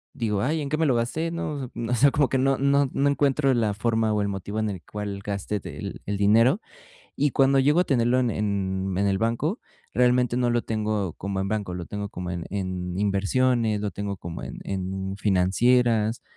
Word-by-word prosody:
digo: 110 -6 -1
"Ay, 155 +7 0
¿en 140 - -4
qué 155 - 0
me 160 0 +2
lo 130 - +3
gasté, 120 +8 -1
no?" 150 -6 -4 0.2
O 120 - 0
sea, 135 +4 +5
como 140 0 +2
que 135 - +1
no 135 0 +2
no 140 0 +2
no 140 - +1
encuentro 140 -1 +2
la 110 -4 +1
forma 110 0 +1
o 105 -1 +1
el - - -1
motivo 100 +1 -4
en 110 -1 0
el 95 -3 -7
cual 100 -1 -5
gaste 100 +1 -3
del - - -7
el 100 0 -1
dinero. 115 - +4 0.6
Y 145 0 +2
cuando 135 0 +4
llego 145 +5 +4
a - - +3
tenerlo 125 -3 +2
en 125 -2 +1
en 95 -3 -1
en 100 +1 +2
el 95 -1 +1
banco, 120 - 0 0.3
realmente, 125 -1 +3
no 125 -1 +2
lo 120 0 +1
tengo 105 -5 -2
como 100 0 -3
en 95 - -2
banco, 105 -4 -2
lo 90 -1 -5
tengo 105 0 -5
como 90 -2 -6
en 85 -2 -4
en 95 -2 -3
inversiones, 110 +2 +1
lo 105 -1 -2
tengo 100 0 -4
como 85 -1 -7
en - - -8
en 95 0 -4
financieras 110 +4 +2
110 Hz, 210 wpm, -25 LUFS, 100-130 Hz, 0.6 s, sea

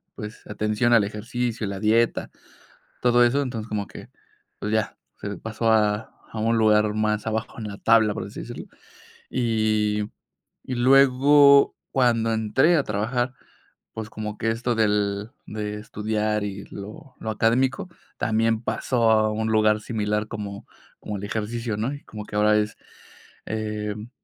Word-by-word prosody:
pues, 105 +2 -8
atención 105 +3 +1
al 110 -3 +6
ejercicio, 115 +2 -3
la 100 -1 -4
dieta, 115 +2 +2 0.7
todo 120 0 +5
eso, 135 +4 +2
entonces 115 -5 -4
como 105 -2 -2
que, - - -11 0.5
pues, 105 +1 -3
ya, 110 -2 0 0.2
se 100 -2 -4
pasó 110 +2 -1
a 105 0 +2 0.2
a 110 - -4
un 115 +1 +2
lugar 105 -1 +4
más 105 0 0
abajo 110 +1 -3
en 110 - -5
la 100 - -7
tabla, 110 -2 +4
por - - -5
así - - -8
decirlo. - - -8 0.7
Y 110 -3 +1 0.6
y 130 - -4
luego, 140 +2 +6 0.2
cuando 115 -3 +2
entré 125 +10 +3
a 140 - +2
trabajar, 120 +5 -1 0.6
pues, 110 -1 -6
como 105 -1 -6
que 115 0 0
esto 120 +1 -1
del 105 -1 0 0.2
de 105 -1 -4
estudiar 105 0 -2
y 100 0 -6
lo 125 +7 -10
lo 110 - -4
académico, 130 - +1 0.3
también 115 0 +1
pasó 115 +1 +1
a 110 -1 +3
un 110 +1 -1
lugar 110 0 +3
similar 105 -1 -1
como 100 -2 -6 0.3
como 105 -1 -5
el 100 - -8
ejercicio, 110 +1 -3
¿no? 120 +6 -1
Y 145 - -9
como 105 -1 -8
que 105 - -9
ahora 105 0 +4
es, 105 0 -1 0.7
em, 105 0 -4
110 Hz, 155 wpm, -24 LUFS, 105-120 Hz, 0.7 s, al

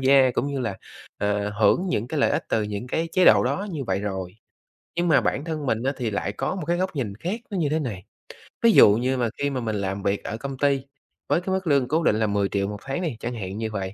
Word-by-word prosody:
gia 135 -1 +5
cũng 125 - -1
như 140 -1 -2
là, 115 -6 -2 0.4
ờ, 105 0 0
hưởng 110 - +2
những 115 -8 -1
cái 155 0 -1
lợi - - +3
ích - - 0
từ 110 - +1
những 105 +2 -4
cái 165 +6 -1
chế 185 - +4
độ - - +7
đó 200 - -1
như 150 -6 -4
vậy 95 -3 -1
rồi. 95 -2 -4 0.6
Nhưng 175 0 +1
mà 145 -5 +5
bản 135 +4 -1
thân 155 -3 -4
mình 115 -2 0
á 135 +2 +1
thì 120 -4 -2
lại 100 - -2
có - - -2
một 180 - -4
cái 170 +1 +1
góc 185 -2 -2
nhìn 115 -8 -2
khác 180 - -4
nó 200 - -3
như 155 -4 +1
thế 155 +2 +1
này. 110 - -4 0.6
Ví 230 0 +6
dụ 105 - +8
như 130 +3 0
mà 120 -2 +1
khi 140 - 0
mà 135 -2 -2
mình 110 -2 -2
làm 100 -1 -3
việc 100 0 0
ở 110 - -4
công 135 +3 -6
ty 140 0 +2 0.5
với 170 - +2
cái 190 +1 -2
mức 190 -1 -3
lương 140 -4 +3
cố 160 +5 +1
định 110 - +3
là 110 0 +1
10.000.000 100 -1 0
một 105 0 -5
tháng 135 +5 -3
đi, 160 -10 -3
chẳng 120 +3 -4
hạn 95 -3 -5
như 110 0 -2
vậy, 95 -2 -4
125 Hz, 275 wpm, -24 LUFS, 105-155 Hz, 0.6 s, dụ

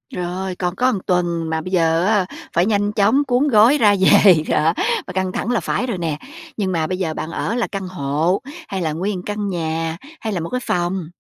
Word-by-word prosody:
Rồi, 180 +1 -3
còn 180 0 -2
có 255 +1 +2
1 200 - -2
tuần, 170 -3 0
mà 160 0 -1
bây 185 - -7
giờ 165 -1 +2
á 205 -3 +2 0.3
phải 175 +2 +3
nhanh 205 -1 +1
chóng 220 +7 +3
cuốn 255 +4 +2
gói 235 +4 +5
ra 205 -5 +4
về, 190 -4 +6
đó, 160 +2 +2 0.3
và - - -6
căng 190 0 -1
thẳng 235 - -2
là 235 - +2
phải 255 - -2
rồi 215 -6 -2
nè. 160 -4 -2 0.4
Nhưng 190 -3 -1
mà 160 -3 0
bây 185 - -2
giờ 165 -4 -2
bạn 160 - -5
ở 225 - -2
là 240 - 0
căn 195 -2 -5
hộ, 165 +2 -1 0.3
hay 190 -2 -3
là 160 -2 -1
nguyên 190 +5 -2
1 180 - -7
căn 205 -1 -3
nhà, 165 -1 -2 0.2
hay 220 -2 -3
là 180 - -1
1 165 - -4
cái 250 - -2
phòng? 175 -1 -1
185 Hz, 235 wpm, -20 LUFS, 165-205 Hz, 0.4 s, về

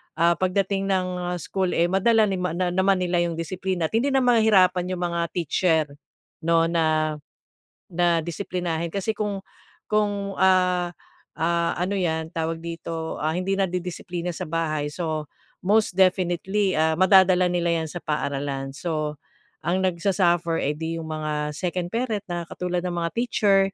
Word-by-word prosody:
ah, 170 +1 +3
pagdating 195 +1 0
ng 180 -2 -1
school, 185 0 -1
eh, 170 +2 +2
madala 220 +3 +4
nima 180 -3 -1
na 180 0 0
naman 190 +1 +2
nila 175 -1 +1
'yung 170 -1 0
disiplina 175 0 -2
at - - -27
hindi 275 +2 0
mahihirapan 220 -8 +4
yung 175 - -4
mga 170 - -1 0.2
teacher 165 -1 +2 0.6
'no, 165 0 +4
na, 155 -2 +1 0.7
na 175 -1 +2
disiplinahin 170 -1 -3
kasi 200 +2 -1
kung 205 -2 -3 0.5
kung, 205 -2 0
ah, 180 -2 +3 0.5
ah, 170 +1 +1
ano 180 +3 -1
'yan 160 -2 -1
tawag 165 0 -2
dito, 165 -1 -5
ah, 155 +1 0
hindi 185 +2 -1
nadidisiplina 180 -1 -2
sa - - -4
bahay, 155 -3 -1
so 155 -1 -3 0.4
most 210 0 +3
definitely 190 +1 +2
ah 160 0 +3
madadala 185 -1 +5
nila 170 -1 +1
'yan 160 - -5
sa 175 - -5
paaralan. 140 -2 -2
So, 155 -2 -3 0.4
ang 185 +2 0
nag-su-suffer, 175 -2 +1
eh 145 - +1
'di 165 +1 -3
'yung 160 - -6
mga 150 -1 -3
second 180 0 -2
parent 225 -4 -1
na 175 -1 -2
katulad 180 -1 -2
ng 180 -1 -2
mga 170 -1 -1
teacher 215 -4 +3
175 Hz, 150 wpm, -24 LUFS, 165-190 Hz, 0.7 s, madadala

